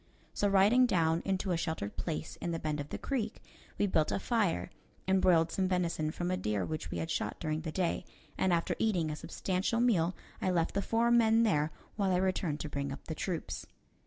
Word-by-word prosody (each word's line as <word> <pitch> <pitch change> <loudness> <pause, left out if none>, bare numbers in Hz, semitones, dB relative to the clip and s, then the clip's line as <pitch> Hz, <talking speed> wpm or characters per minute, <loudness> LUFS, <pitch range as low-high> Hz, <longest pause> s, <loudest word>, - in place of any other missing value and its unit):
So 205 - +1
riding 205 +6 +5
down 165 -5 +2
into 190 0 0
a 170 - +2
sheltered 160 - -3
place 160 -2 -4
in 175 - -4
the 165 - -1
bend 155 -2 -2
of 145 0 -5
the - - -4
creek, 230 -6 -2 0.4
we - - +2
built 160 -6 +2
a - - +1
fire 200 -5 0 0.4
and 190 0 +3
broiled 165 -3 +4
some 190 +1 +1
venison 170 -4 0
from 175 +3 -2
a 185 - 0
deer 105 - -1
which 155 - -4
we - - -4
had 165 - -3
shot - - -2
during 155 -1 -2
the 160 -1 -4
day, 180 0 0 0.3
and 190 - +1
after 170 -1 +1
eating 180 -8 +1
a - - -3
substantial 190 +8 -1
meal, 185 -8 +3 0.3
I - - +1
left 170 -3 +1
the 200 - +1
four 230 +3 +2
men 230 -1 +5
there 155 -8 +2 0.3
while 200 -2 +1
I 180 - +3
returned 180 -5 0
to - - -4
bring 140 -1 -3
up 135 - -8
the 160 - -4
troops. 165 +1 -4
180 Hz, 220 wpm, -32 LUFS, 160-200 Hz, 0.4 s, riding